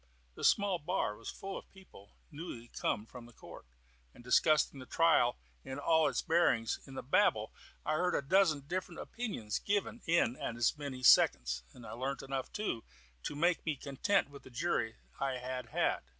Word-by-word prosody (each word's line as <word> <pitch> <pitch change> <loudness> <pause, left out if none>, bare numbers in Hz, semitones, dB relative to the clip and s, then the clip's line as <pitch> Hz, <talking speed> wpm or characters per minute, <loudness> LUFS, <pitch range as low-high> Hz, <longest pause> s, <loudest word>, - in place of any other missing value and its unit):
The - - -10
small 200 -3 +3
bar 150 - -1
was 115 - -8
full 195 0 -6
of - - -18
people 185 - -17 0.2
newly 145 -7 -8
come 105 - -2
from 120 +1 -11
the 120 - -16
court, - - -12 0.5
and - - -14
discussing 145 +3 +3
the 130 - -10
trial 165 -7 +3 0.3
in 130 - -6
all 160 +1 +3
its 135 - -1
bearings. 160 -9 +2
In 135 - -10
the - - -5
babel 130 - +2 0.3
I - - 0
heard 180 +3 +1
a - - 0
dozen 160 -1 +3
different 175 +3 -4
opinions 200 - -4
given 205 +3 -1
in 165 -7 +3
as 120 +4 0
many 140 -4 -6
seconds, 60 - +5
and 120 - -14
learnt 130 +4 -4
enough, 135 -1 -4
too, 210 - -3 0.4
to 145 - -4
make 170 +3 +2
me 155 -3 -1
content 145 +6 0
with 140 - -11
the - - -14
jury 125 -4 -1 0.2
I 135 -2 -1
had 125 0 -5
had. - - +1
140 Hz, 180 wpm, -33 LUFS, 125-170 Hz, 0.5 s, seconds